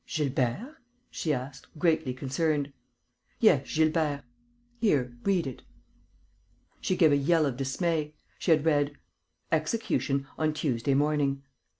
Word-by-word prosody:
"Gilbert?" 150 Hz, -, -1 dB, 0.3 s
she 160 Hz, -, -2 dB
asked, 135 Hz, 0 st, -4 dB
greatly 160 Hz, -5 st, +2 dB
concerned. 140 Hz, +2 st, -1 dB, 0.7 s
"Yes, -, -, +4 dB
Gilbert.... 155 Hz, -2 st, +1 dB, 0.6 s
Here, 130 Hz, -, +1 dB
read 185 Hz, -5 st, +2 dB
it." 130 Hz, -2 st, -6 dB, 1.2 s
She 185 Hz, -, 0 dB
gave 165 Hz, -4 st, +5 dB
a -, -, +5 dB
yell 155 Hz, +3 st, +3 dB
of 135 Hz, -4 st, -1 dB
dismay. 150 Hz, +3 st, -1 dB, 0.2 s
She -, -, -3 dB
had 155 Hz, -2 st, +4 dB
read: 145 Hz, -2 st, +2 dB, 0.5 s
"Execution 155 Hz, -5 st, 0 dB
on 155 Hz, -1 st, +1 dB
Tuesday 135 Hz, -3 st, 0 dB
morning." 140 Hz, -1 st, +1 dB
150 Hz, 115 wpm, -28 LUFS, 135-160 Hz, 1.2 s, gave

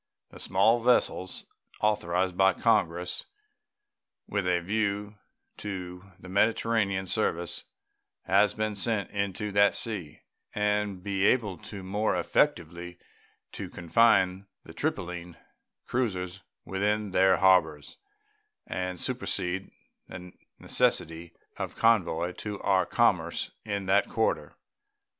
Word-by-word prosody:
The -, -, -12 dB
small 110 Hz, +5 st, +3 dB
vessels 115 Hz, -6 st, +1 dB, 0.3 s
authorized 95 Hz, -3 st, +1 dB
by 95 Hz, 0 st, +4 dB
Congress 90 Hz, -6 st, 0 dB, 1.0 s
with 100 Hz, -3 st, -1 dB
a 90 Hz, -1 st, +2 dB
view 105 Hz, +2 st, -2 dB, 0.4 s
to 95 Hz, -1 st, -7 dB
the 95 Hz, -, -12 dB
Mediterranean 100 Hz, -1 st, +1 dB
service 85 Hz, -4 st, -1 dB, 0.6 s
have 100 Hz, +1 st, +3 dB
been 110 Hz, -1 st, -1 dB
sent 100 Hz, 0 st, -1 dB
into 100 Hz, +1 st, -2 dB
that 100 Hz, 0 st, +4 dB
sea, 95 Hz, -10 st, -3 dB, 0.3 s
and 105 Hz, -1 st, 0 dB
will 90 Hz, -, -15 dB
be 100 Hz, -1 st, 0 dB
able 105 Hz, -7 st, +1 dB, 0.2 s
more 100 Hz, +2 st, 0 dB
effectually 85 Hz, -, 0 dB, 0.5 s
to -, -, -6 dB
confine 95 Hz, +1 st, +2 dB, 0.2 s
the -, -, -12 dB
Tripoline 90 Hz, -1 st, -3 dB, 0.5 s
cruisers 95 Hz, -7 st, -2 dB, 0.2 s
within 105 Hz, +1 st, -1 dB
their 95 Hz, 0 st, +4 dB
harbors 80 Hz, -6 st, +2 dB, 0.7 s
and 90 Hz, -1 st, -4 dB
supersede 90 Hz, +2 st, -2 dB, 0.4 s
the 90 Hz, 0 st, -9 dB, 0.3 s
necessity 80 Hz, +1 st, 0 dB, 0.2 s
of -, -, -4 dB
convoy 90 Hz, -6 st, +2 dB
to 105 Hz, -2 st, -5 dB
our 95 Hz, -2 st, +2 dB
commerce -, -, +1 dB
in 100 Hz, -2 st, -3 dB
that 95 Hz, +2 st, +3 dB
quarter. -, -, -1 dB
95 Hz, 105 wpm, -28 LUFS, 90-105 Hz, 1.0 s, by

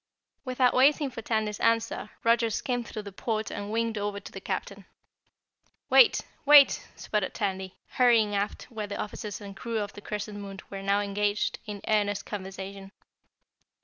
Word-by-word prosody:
Without 255 Hz, -1 st, +2 dB
waiting 280 Hz, +1 st, +4 dB
for 230 Hz, -, -7 dB
Tandy's 215 Hz, -2 st, -1 dB
answer, 230 Hz, -2 st, +1 dB
Roger 230 Hz, 0 st, +3 dB
skimmed 245 Hz, +2 st, -2 dB
through 215 Hz, -, -6 dB
the 200 Hz, -, -8 dB
port 220 Hz, +2 st, -2 dB
and 205 Hz, 0 st, -5 dB
winged 225 Hz, -1 st, 0 dB
over 205 Hz, 0 st, -2 dB
to 200 Hz, -, -11 dB
the 195 Hz, -, -8 dB
Captain. 195 Hz, +1 st, -4 dB, 1.1 s
"Wait! -, -, +7 dB, 0.2 s
Wait!" 290 Hz, -1 st, +7 dB
sputtered 210 Hz, -3 st, -2 dB
Tandy, 190 Hz, -3 st, -3 dB
hurrying 230 Hz, -4 st, +4 dB
aft 200 Hz, +1 st, -2 dB
where 215 Hz, -3 st, -4 dB
the 205 Hz, -, -5 dB
officers 210 Hz, 0 st, -5 dB
and 200 Hz, -2 st, -9 dB
crew 230 Hz, +3 st, -3 dB
of 205 Hz, -2 st, -3 dB
the 205 Hz, -, -10 dB
Crescent 210 Hz, 0 st, -5 dB
Moon 195 Hz, -1 st, -8 dB
were 195 Hz, -1 st, -5 dB
now 200 Hz, +1 st, +2 dB
engaged 205 Hz, +1 st, 0 dB
in 205 Hz, -1 st, -6 dB
earnest 205 Hz, -2 st, +1 dB
conversation. 195 Hz, 0 st, -7 dB
210 Hz, 160 wpm, -28 LUFS, 200-230 Hz, 1.1 s, Wait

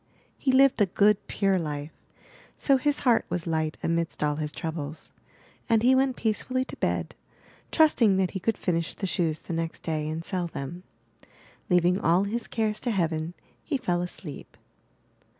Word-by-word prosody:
He 265 Hz, -, +2 dB
lived 265 Hz, -3 st, +5 dB
a 205 Hz, -, +5 dB
good, 205 Hz, +2 st, +3 dB
pure 195 Hz, -2 st, +1 dB
life; 150 Hz, -1 st, -4 dB, 0.7 s
so 275 Hz, -2 st, +3 dB
his 290 Hz, +2 st, 0 dB
heart 240 Hz, -4 st, +4 dB
was 175 Hz, -2 st, -2 dB
light 160 Hz, -2 st, -1 dB
amidst 165 Hz, -1 st, -1 dB
all 150 Hz, 0 st, +1 dB
his 150 Hz, -1 st, -3 dB
troubles, 160 Hz, -1 st, -6 dB, 0.6 s
and 225 Hz, -1 st, +3 dB
he 255 Hz, +2 st, +6 dB
went 260 Hz, -1 st, +2 dB
peace 220 Hz, -3 st, 0 dB
fully 255 Hz, 0 st, -1 dB
to -, -, -9 dB
bed, -, -, -1 dB, 0.6 s
trusting 240 Hz, -, +4 dB
that 190 Hz, -1 st, +1 dB
he 190 Hz, -, -4 dB
could 225 Hz, +4 st, 0 dB
finish 170 Hz, -2 st, -1 dB
the 195 Hz, -, -4 dB
shoes 170 Hz, -4 st, 0 dB
the -, -, -6 dB
next 165 Hz, 0 st, -3 dB
day 155 Hz, -2 st, -2 dB
and 160 Hz, +1 st, -4 dB
sell 180 Hz, -3 st, -1 dB
them. 165 Hz, +2 st, -6 dB, 0.9 s
Leaving 180 Hz, +1 st, +3 dB
all 175 Hz, +4 st, +3 dB
his 220 Hz, +3 st, -3 dB
cares 215 Hz, -2 st, -1 dB
to 245 Hz, -, -3 dB
heaven, 165 Hz, -4 st, -1 dB, 0.3 s
he 295 Hz, -, -1 dB
fell 175 Hz, -8 st, 0 dB
asleep. 175 Hz, -4 st, -7 dB
180 Hz, 170 wpm, -27 LUFS, 165-225 Hz, 0.9 s, he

